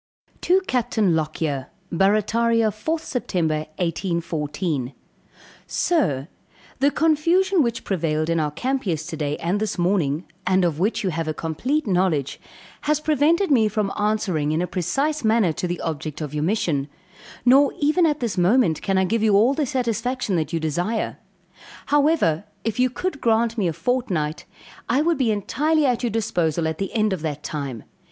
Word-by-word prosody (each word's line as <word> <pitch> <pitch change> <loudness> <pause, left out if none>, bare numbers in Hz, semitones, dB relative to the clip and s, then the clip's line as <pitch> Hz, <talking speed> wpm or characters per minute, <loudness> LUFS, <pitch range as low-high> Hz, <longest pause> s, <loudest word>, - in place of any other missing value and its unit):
To 370 +2 +3
CAPTAIN 235 - +1
LOCKYER. 155 -3 -2 0.2
Barrataria, 215 +4 +2
4th 315 +10 -3 0.2
Sept. - - -10 0.4
1814. 165 -5 -2 0.7
Sir 155 - 0 0.5
The 280 - +4
confusion 335 +5 +2
which 235 -3 -1
prevailed 155 -4 -1
in 165 0 +1
our 150 -1 0
camp 255 - -2
yesterday 155 -3 -2
and 175 +6 -1
this 215 -1 -2
morning, 175 -4 +1 0.2
and 185 -1 +3
of 160 -3 -1
which 215 +4 0
you 190 - 0
have 165 0 -3
a 155 - -2
complete 250 - -1
knowledge, 180 - 0 0.5
has 300 -1 +3
prevented 310 +5 +2
me 225 -6 +5
from 210 -2 -1
answering 205 -8 0
in 155 - 0
a - - +1
precise 275 - -1
manner 220 -6 +3
to 180 - -3
the 175 0 -3
object 155 -2 -4
of 150 -2 -5
your 150 0 -1
mission; 160 -8 0 0.6
nor 270 +3 +6
even 310 +4 +3
at 300 -2 -1
this 225 -6 -1
moment 180 - +3
can 195 -1 0
I 190 - +3
give 225 +4 0
you 215 -2 +4
all 230 +7 +5
the 290 -1 -1
satisfaction 245 -3 -1
that 160 -2 -1
you 165 - -1
desire; 175 +8 -2 0.7
however, 290 - +2 0.2
if 225 +1 -2
you 255 0 +4
could 290 +5 -4
grant 230 0 +2
me 205 -6 0
a 165 - -1
fortnight, 170 -5 -1 0.4
I 285 - +3
would 335 -1 +1
be 250 -4 +2
entirely 295 +9 +1
at 250 -3 +1
your 240 - 0
disposal 170 -7 0
at 160 0 -3
the 195 - -2
end 215 -2 +2
of 180 - -4
that 150 -2 -4
time. 140 -7 -5
205 Hz, 165 wpm, -23 LUFS, 160-255 Hz, 0.7 s, nor